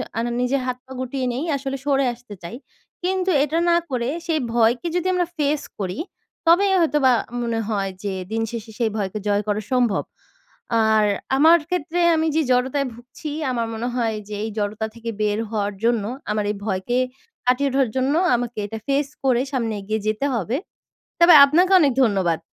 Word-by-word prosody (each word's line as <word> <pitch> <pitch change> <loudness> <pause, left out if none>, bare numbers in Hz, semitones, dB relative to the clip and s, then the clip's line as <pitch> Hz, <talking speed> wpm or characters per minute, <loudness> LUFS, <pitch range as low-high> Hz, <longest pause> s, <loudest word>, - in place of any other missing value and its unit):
আর 230 - 0
না 240 - -2
নিজের 260 +2 +1
হাত 250 - -2
পা 265 - -17
গুটিয়ে 260 +1 -3
নেই 260 +6 -3
আসলে 275 0 -3
সরে 275 -1 +2
আসতে 240 -3 -13
চাই। 170 - -7 0.5
কিন্তু 375 0 0
এটা 305 +3 -1
না 340 - +5
করে 245 -2 -1 0.2
সেই 320 -2 +1
ভয়কে 240 +7 +2
যদি 355 +1 0
আমরা 355 -1 +1
ফেস 295 0 +1 0.2
করি, 185 -2 -3 0.5
তবেই 385 +4 +5
হয়তো 300 -2 +2
বা 260 - +7 0.3
মনে 230 -1 -1
হয় 200 -3 -1
যে 200 - -2 0.2
দিন 225 - 0
শেষে 225 -1 -6
সেই 230 - +2
ভয়কে 205 0 -2
জয় 205 0 +2
করা 210 0 0
সম্ভব। 240 -6 +2 0.9
আর 215 -1 +4 0.3
আমার 325 +4 +7
ক্ষেত্রে 350 -1 -2 0.2
আমি 320 0 +1
যে 320 - +3
জড়তায় 260 +2 +1
ভুগছি 245 +6 -9 0.2
আমার 230 -2 -1
মনে 230 +2 -3
হয় 225 -3 0
যে - - -6
এই 220 - -2
জড়তা 210 +1 -2
থেকে 230 0 -6
বের 210 0 +1
হওয়ার 205 -2 -1
জন্য 230 -2 +2 0.3
আমার 210 -1 0
এই - - -5
ভয়কে 200 +4 -1 0.5
কাটিয়ে 255 +3 +2
উঠার 270 -2 +2
জন্য 260 +2 +1 0.2
আমাকে 240 -1 -3
এটা 225 - -6
ফেস 280 +1 +1 0.2
করে 250 -2 +3
সামনে 230 -4 -1
এগিয়ে 215 +2 -2
যেতে 215 +5 0
হবে। 230 +5 -1 0.6
তবে 340 0 +8
আপনাকে 355 +7 +3
অনেক 280 -4 +3
ধন্যবাদ। 190 -8 +1
245 Hz, 185 wpm, -22 LUFS, 220-280 Hz, 0.9 s, তবে